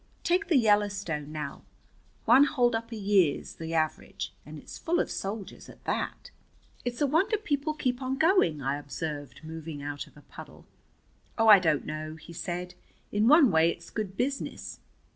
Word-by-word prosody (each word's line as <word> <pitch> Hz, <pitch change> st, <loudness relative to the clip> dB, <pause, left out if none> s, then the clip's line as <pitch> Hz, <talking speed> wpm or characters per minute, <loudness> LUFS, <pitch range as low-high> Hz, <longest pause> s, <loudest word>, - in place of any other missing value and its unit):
Take 365 Hz, +3 st, +1 dB
the 335 Hz, -5 st, +4 dB
Yellowstone, 205 Hz, -, +1 dB
now, 155 Hz, -1 st, -5 dB, 0.6 s
one 280 Hz, -, +7 dB
holdup 240 Hz, -5 st, +1 dB
a -, -, -4 dB
year's 195 Hz, -7 st, +1 dB
the 165 Hz, 0 st, -4 dB
average, 155 Hz, -1 st, -2 dB
and -, -, -8 dB
it's -, -, -10 dB
full 345 Hz, +1 st, 0 dB
of -, -, -1 dB
soldiers 200 Hz, 0 st, -5 dB
at -, -, -15 dB
that." -, -, -3 dB, 0.5 s
"It's 245 Hz, +1 st, -4 dB
a -, -, +5 dB
wonder 325 Hz, -, +2 dB
people 305 Hz, -6 st, -1 dB
keep 255 Hz, -4 st, -1 dB
on 260 Hz, +1 st, -2 dB
going," 275 Hz, -, +3 dB
I 140 Hz, +2 st, -1 dB
observed 145 Hz, 0 st, -6 dB
moving 160 Hz, -2 st, -7 dB
out 145 Hz, -1 st, -5 dB
of -, -, -20 dB
a 145 Hz, -, -15 dB
puddle. -, -, -12 dB, 0.7 s
"Oh, 225 Hz, -1 st, +4 dB
I 205 Hz, -2 st, +10 dB
don't 155 Hz, -5 st, +1 dB
know," 155 Hz, 0 st, -5 dB
he 160 Hz, +2 st, -12 dB
said. 180 Hz, +1 st, -4 dB, 0.4 s
"In 210 Hz, +2 st, +2 dB
one 290 Hz, -, +7 dB
way 160 Hz, 0 st, +4 dB
it's -, -, -7 dB
good 200 Hz, -3 st, -4 dB
business. 275 Hz, +2 st, -3 dB
205 Hz, 170 wpm, -28 LUFS, 155-265 Hz, 0.7 s, I